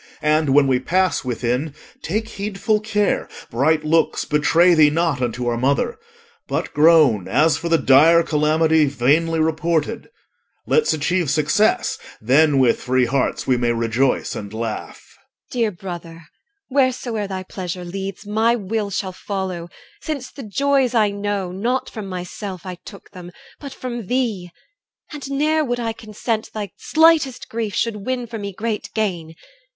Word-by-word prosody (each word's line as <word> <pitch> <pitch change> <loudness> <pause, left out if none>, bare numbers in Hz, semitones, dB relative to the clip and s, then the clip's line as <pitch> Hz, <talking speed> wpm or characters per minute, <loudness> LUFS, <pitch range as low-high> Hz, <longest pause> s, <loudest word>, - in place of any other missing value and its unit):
And, 150 -2 +2
when 145 -1 +6
we 130 -2 +2
pass 185 +7 +1
within, 125 +4 -2 0.3
take 215 +6 -2
heedful 210 +1 -1
care 210 -1 0 0.2
Bright 150 +6 +2
looks 160 +2 +1
betray 165 +4 +4
thee 155 -3 +6
not 160 -3 0
unto 120 0 -2
our 120 -1 -1
mother. 140 - 0 0.5
But - - -3
groan 150 - +5
as 155 +2 +3
for 170 - -4
the 165 - +4
dire 160 +5 +5
calamity 155 0 +2
Vainly 145 +5 +1
reported: 160 +5 -1 0.6
Let's 465 - +2
achieve 160 +1 0
success, 155 +9 +1 0.2
Then 140 +5 +3
with 130 -3 +3
free 130 0 +2
hearts 130 +2 -1
we 130 - +2
may 120 -1 +1
rejoice 115 +3 0
and 100 -1 -6
laugh. 110 0 -5 0.2
EL. - - -35 0.3
Dear 235 -3 +1
brother, 170 -3 -8 0.5
wheresoe'er 250 -5 0
thy 190 -1 -5
pleasure 180 -1 -6
leads, 195 +3 -6
My 220 +3 +2
will 210 -1 -3
shall 190 -1 -3
follow, 185 -3 -5 0.3
since 280 -5 -5
the 280 - -10
joys 265 +3 +1
I 215 -3 +3
know, 200 -2 -3
Not 235 +8 -2
from 215 -4 -7
myself 185 +1 -6
I 180 -1 -7
took 200 - -12
them, 180 -1 -10 0.3
but 280 -2 -8
from 240 -5 -6
thee. 225 -8 -1 0.6
And 280 -2 -7
ne'er 305 +3 +1
would 245 -3 -2
I 230 -1 -2
consent 220 +1 -4
thy 205 -3 -4
slightest 315 -5 +2
grief 220 -3 -3
Should 230 -2 0
win 255 -1 -1
for 230 -1 -7
me 200 -1 -5
great 215 +3 -4
gain. 175 -7 -2
180 Hz, 155 wpm, -21 LUFS, 150-220 Hz, 0.6 s, when